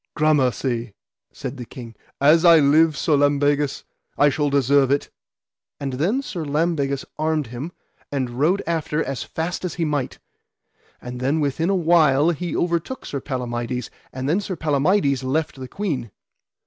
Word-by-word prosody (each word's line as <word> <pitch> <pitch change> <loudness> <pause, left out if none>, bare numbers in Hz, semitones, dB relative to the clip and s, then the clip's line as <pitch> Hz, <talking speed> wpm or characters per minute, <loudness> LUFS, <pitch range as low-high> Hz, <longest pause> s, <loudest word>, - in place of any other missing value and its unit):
Gramercy, 130 -7 +1 0.4
said 135 - -6
the 125 - -6
king, 115 -1 -10 0.3
as 155 +4 +5
I 170 -2 +8
live, 155 +1 +4
Sir 155 - +2
Lambegus, 145 0 +1 0.3
I 145 - +5
shall 145 +1 0
deserve 140 -1 +3
it. 140 +1 0 0.7
And 135 -2 -3
then 190 - 0
Sir 175 -10 -5
Lambegus 145 -2 0
armed 155 -1 0
him, 140 +8 -5 0.4
and 130 -4 -2
rode 180 +7 +2
after 160 -2 -1
as 135 - -4
fast 170 +3 -4
as 180 -4 -3
he 170 - -1
might. 145 -4 -2 0.9
And 125 0 -6
then 135 +5 +1
within 150 +4 0
a 195 - +2
while 160 -3 +4
he 170 0 -3
overtook 170 +9 -2
Sir 140 - -4
Palamides. 125 -2 -4 0.2
And 130 +1 -4
then 165 +7 +2
Sir 195 -2 -4
Palamides 150 -2 +1
left 150 +3 -1
the 130 - -6
queen. 140 - -3
145 Hz, 155 wpm, -22 LUFS, 135-165 Hz, 0.9 s, I